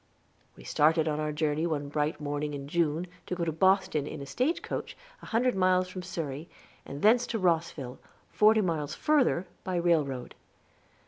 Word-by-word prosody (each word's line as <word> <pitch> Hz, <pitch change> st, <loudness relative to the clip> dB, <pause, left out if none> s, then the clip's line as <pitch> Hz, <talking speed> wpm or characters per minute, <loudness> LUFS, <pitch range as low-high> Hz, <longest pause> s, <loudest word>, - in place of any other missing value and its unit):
We -, -, -14 dB
started 155 Hz, -, +3 dB
on 150 Hz, -1 st, -1 dB
our 155 Hz, 0 st, -1 dB
journey 150 Hz, +2 st, 0 dB
one 145 Hz, -3 st, -2 dB
bright 150 Hz, +1 st, -1 dB
morning 145 Hz, 0 st, -3 dB
in 140 Hz, 0 st, -7 dB
June, 165 Hz, +1 st, 0 dB, 0.2 s
to 180 Hz, -, -2 dB
go 175 Hz, -1 st, -2 dB
to 165 Hz, -, 0 dB
Boston 160 Hz, -3 st, +2 dB
in 155 Hz, -, -6 dB
a 140 Hz, -, -6 dB
stagecoach, 255 Hz, -, -2 dB, 0.2 s
a -, -, -11 dB
hundred 245 Hz, +2 st, +2 dB
miles 185 Hz, -1 st, +2 dB
from 185 Hz, 0 st, -6 dB
Surrey, 165 Hz, -4 st, -5 dB, 0.4 s
and 140 Hz, +1 st, -7 dB
thence 235 Hz, +3 st, +5 dB
to 230 Hz, -, -2 dB
Rosville, 165 Hz, -, -1 dB, 0.3 s
forty 215 Hz, +1 st, +5 dB
miles 160 Hz, -6 st, -2 dB
further, 275 Hz, -, +2 dB, 0.2 s
by 185 Hz, -, -3 dB
railroad. 155 Hz, -7 st, 0 dB
160 Hz, 170 wpm, -29 LUFS, 150-185 Hz, 0.4 s, thence